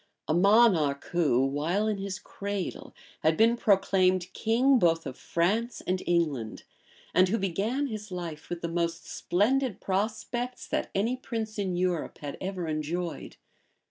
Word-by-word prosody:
a - - +1
monarch, 180 -7 +4
who, 145 -7 +3
while 160 +10 0
in 210 -2 -1
his 195 -1 -4
cradle, 200 -2 -5 0.3
had 155 0 +2
been 230 +2 +5
proclaimed 185 -4 +2
king 250 +5 +3
both 165 -3 +2
of 130 - -5
France 210 - 0
and 185 0 0
England, 150 -10 0 0.5
and 185 0 +5
who 225 - +1
began 205 +9 -1
his 215 -5 -6
life 170 -4 -6
with 175 -1 -4
the 170 - -2
most 170 0 -2
splendid 245 +5 0
prospects 225 +5 -2
that - - -2
any 225 +6 +1
prince 225 -4 -5
in 190 -3 -1
Europe 180 -2 -1
had 145 -1 -6
ever 185 -2 -3
enjoyed. 160 +3 -3
185 Hz, 145 wpm, -28 LUFS, 170-215 Hz, 0.5 s, been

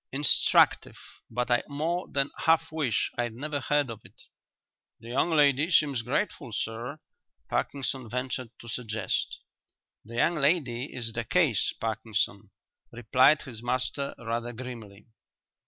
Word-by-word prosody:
"Instructive, 140 +1 +4 0.3
but 125 +2 -2
I 120 - +4
more 160 +5 -2
than 140 0 0
half 160 0 +3
wish 145 -9 0
I'd 120 -2 -1
never 145 +3 -3
heard 145 -1 +1
of 110 -1 -9
it." - - -17 0.8
"The 115 - -11
young 135 +7 +1
lady 145 -1 +4
seems 145 -8 +3
grateful, 125 - -2
sir," 115 +6 -3 0.5
Parkinson 130 -3 -1
ventured 125 0 -3
to 115 - -12
suggest. 115 -4 -2 0.7
"The 115 +2 -11
young 160 +8 +3
lady 140 -4 +1
is 115 -2 -3
the 115 - -2
case, 140 - +2
Parkinson," 110 -2 -2 0.4
replied 130 +5 +4
his 120 -6 -9
master 130 +3 -2
rather 120 +1 -3
grimly. 115 -5 -9
125 Hz, 130 wpm, -28 LUFS, 115-145 Hz, 0.8 s, Instructive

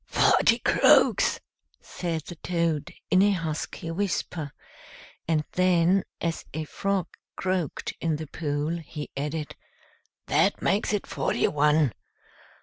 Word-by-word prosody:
"Forty - - +4
croaks," - - +4 0.4
said 165 -3 -4
the - - -8
Toad, 165 -4 -1 0.2
in 185 - +6
a 205 - +5
husky 165 -2 -3
whisper; 165 -5 -2 0.8
and 155 -2 +2
then, 180 +1 +3
as 165 -1 -2
a 160 - -2
frog 195 +3 -1 0.3
croaked 185 -4 -2
in 165 -2 +1
the 155 +1 -5
pool, 150 +2 -2
he 150 -2 -8
added, 150 +2 -4 0.7
"That - - +2
makes 200 +2 +1
it 210 -2 -1
forty - - 0
one. 150 -3 +3
165 Hz, 120 wpm, -26 LUFS, 150-180 Hz, 0.8 s, in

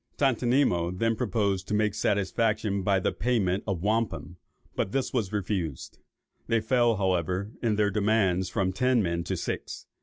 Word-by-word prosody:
Tontonimo 120 -9 +2
then 115 +3 +1
proposed 100 -4 -1
to 105 - -1
make 105 -1 +1
satisfaction 105 0 0
by 95 0 +2
the - - 0
payment 105 -5 0
of 95 -4 -2
wampum, 105 -4 -1 0.4
but 100 - -2
it 135 - 0
was 110 -7 -1
refused. 95 -8 -3 0.5
They 115 -1 +2
fell, 120 +1 +2
however, 95 +1 -1
in 115 -3 +1
their 105 -1 +2
demands 95 -3 +1
from 95 -1 -1
ten 125 +2 +2
men 85 -1 -1
to - - -2
six. - - -5
105 Hz, 155 wpm, -27 LUFS, 95-115 Hz, 0.5 s, Tontonimo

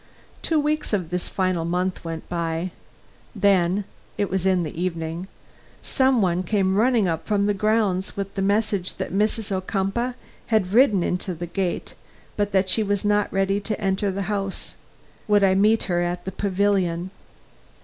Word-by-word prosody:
Two 320 -2 +1
weeks 300 -4 -1
of 180 -5 -1
this 180 0 -2
final 185 -3 0
month 180 +2 -1
went 165 -1 -6
by. 170 +1 -2 0.6
Then 195 -1 +3 0.3
(it 200 - -1
was 190 0 0
in 185 -2 +3
the 155 - -5
evening) 170 0 -3 0.6
some 260 -5 +3
one 180 -1 +1
came 190 0 +1
running 225 -1 +3
up 165 -2 -2
from 205 -2 +2
the 205 - +2
grounds, 205 -2 0
with 195 0 -3
the 195 - -2
message 200 -2 0
that - - -5
Mrs. 215 +1 0
Ocumpaugh 195 +6 -1 0.3
had 210 -4 +1
ridden 220 -7 +5
into 180 +1 -2
the 175 +2 -5
gate, 175 +1 -3 0.4
but 205 -1 0
that 190 -1 +2
she 220 - +3
was 205 -1 -1
not 205 0 +2
ready 195 +1 +1
to 210 +1 -3
enter 195 0 0
the 195 +1 -2
house. 195 -1 -3 0.5
Would 205 -1 +4
I 190 -1 +5
meet 210 +3 +3
her 175 -2 0
at 175 0 -2
the 190 - -3
pavilion? 190 -3 0
195 Hz, 170 wpm, -24 LUFS, 180-205 Hz, 0.6 s, ridden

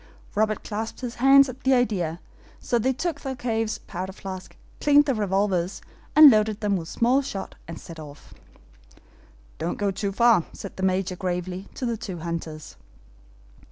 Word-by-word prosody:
Robert 215 0 0
clapped 220 +3 -5
his 245 -2 -4
hands 275 +1 +7
at 255 0 -9
the 265 0 +3
idea, 185 -9 0 0.4
so 240 - 0
they 260 +4 +2
took 295 +3 -3
Thalcave's 230 -4 -2
powder 185 +2 -6
flask, 190 -1 -8 0.2
cleaned 290 0 +5
the 275 - +1
revolvers 195 -4 0 0.4
and 305 -2 +11
loaded 215 -1 +2
them 205 -2 +1
with 165 -3 -4
small 245 +8 +2
shot, 200 -8 -6
and 165 -1 -7
set 165 -1 -11
off. 145 -2 -12 1.3
"Don't 170 +2 -2
go 205 -1 0
too 200 +1 -3
far," 230 -3 +4
said 200 - -8
the - - -7
Major, 185 0 0
gravely, 180 0 -4
to 255 - -3
the 235 -2 -1
two 190 -4 -6
hunters. 165 -2 -6
205 Hz, 160 wpm, -25 LUFS, 185-240 Hz, 1.3 s, and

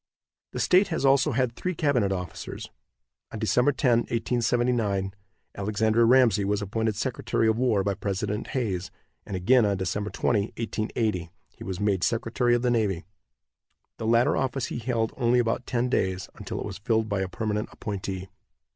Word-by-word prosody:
The - - -4
state 185 +2 +4
has 160 -5 -1
also 135 +1 +4
had 125 -1 +1
three 185 -1 -3
cabinet 130 -11 +1
officers. 90 -3 -5 0.6
On - - -6
Dec. - - 0
10, 125 - +4 0.4
1879, 115 -4 0 0.4
Alexander 110 +3 +2
Ramsey 120 -5 +5
was 100 +1 0
appointed 110 +1 -1
secretary 115 0 0
of 110 +1 +2
war 115 -6 +2
by 100 +1 0
President 100 +2 -3
Hayes, 100 -9 -2 0.4
and 100 - -4
again 120 +7 +4
on 100 -2 +1
Dec. 100 +3 -2
20, 110 - +1 0.2
1880, 110 -5 -2 0.2
he - - -12
was 95 -1 -4
made 100 -4 +1
secretary 120 +1 +1
of 120 - -1
the 125 - +2
navy. 100 -8 0 0.9
The 110 - -4
latter 115 +2 +4
office 135 -1 -1
he - - -3
held 115 -2 -1
only 120 -1 +3
about 120 +1 0
ten 120 0 0
days, 95 -6 -1
until - - -6
it - - -4
was - - -6
filled 110 +1 +1
by 100 -2 -1
a 95 - -1
permanent 105 +1 -2
appointee. 95 -2 -5
110 Hz, 165 wpm, -26 LUFS, 100-120 Hz, 0.9 s, Ramsey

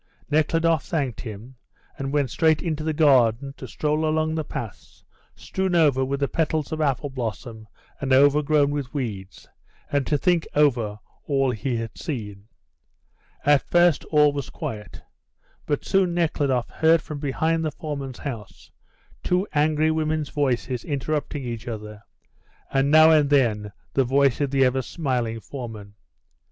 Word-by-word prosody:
Nekhludoff 160 +1 +2
thanked 140 - -2
him, 115 +3 -9 0.4
and 135 0 -4
went 140 -4 0
straight 160 -2 +3
into 155 -3 -2
the 160 - 0
garden 135 -4 +3
to - - -8
stroll 150 +1 -1
along 155 0 +1
the 160 -1 -1
paths 115 -7 -8 0.3
strewn 190 -1 -2
over 145 -6 +4
with 140 +1 -2
the 140 - +2
petals 155 -2 -1
of 155 0 -2
apple 140 -1 0
blossom 115 -2 -6 0.3
and 135 -1 -3
overgrown 145 +2 +4
with 140 -3 -3
weeds, 105 -9 -5 0.4
and 140 -2 0
to 150 - +2
think 175 +1 +1
over 120 -8 +2 0.3
all 135 -2 +2
he 120 +2 -2
had 115 -1 -4
seen. 105 - -6 1.0
At 145 -1 +5
first 175 -3 +4
all 150 -1 +4
was 140 -2 -4
quiet, 105 -2 -7 0.6
but 145 - -1
soon 190 -3 +2
Nekhludoff 145 -7 0
heard 160 0 +3
from 150 -2 -6
behind 160 +3 0
the 155 - 0
foreman's 140 -4 -6
house 115 -8 -8 0.5
two 180 +3 0
angry 155 +1 +2
women's 155 -1 -1
voices 130 -4 -1
interrupting 145 0 -3
each 115 -1 -6
other, 105 -2 -7 0.7
and 135 +1 +2
now 155 +1 +7
and 150 -3 +4
then 110 -7 +2 0.2
the 135 - +3
voice 135 +1 +2
of 140 - +1
the 135 0 +3
ever 130 +1 +1
smiling 125 -5 -2
foreman. 110 -3 -8
140 Hz, 150 wpm, -24 LUFS, 125-155 Hz, 1.0 s, now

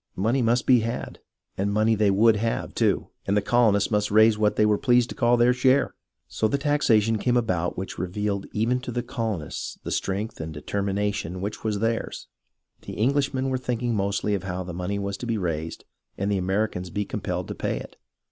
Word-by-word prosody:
Money 115 +7 +1
must 120 +1 +2
be 125 -2 +6
had, 115 +2 -4 0.4
and 100 +1 +1
money 110 +2 +3
they 105 -1 +3
would 105 +3 +4
have, 115 +2 -2
too, - - +1 0.2
and 100 +1 +2
the - - +5
colonies 110 -5 +3
must 105 -1 +1
raise 110 +1 +5
what 105 0 +1
they 105 - +4
were 105 -1 +2
pleased 125 -1 +3
to - - -7
call 120 0 +3
their 120 +1 +4
share. 130 +2 +3 0.3
So 110 - 0
the 125 - 0
taxation 115 -7 +2
came 125 +3 +2
about 90 -7 0
which 95 +1 -5
revealed 100 +2 -2
even 115 +4 +1
to 125 -1 -6
the 120 0 -2
colonists 110 - -4
the - - -5
strength 100 +1 -2
and 80 0 -5
determination 100 +2 -2
which 100 +3 -5
were 110 -2 0
theirs. 115 +2 -2 0.6
The - - -8
Englishmen 135 +2 +1
were 130 -1 -1
thinking 120 -1 -1
mostly 100 0 0
of 100 - 0
how 95 -1 -4
the 90 -1 -7
money 90 +3 -3
was 100 0 -3
to 120 - -6
be 115 -1 0
raised 80 -4 -3 0.3
and 100 +1 -1
the 100 - +1
Americans 95 -1 -1
be 105 +4 -2
compelled 90 -3 -3
to - - -3
pay - - -2
it. - - -9
105 Hz, 205 wpm, -25 LUFS, 100-120 Hz, 0.6 s, be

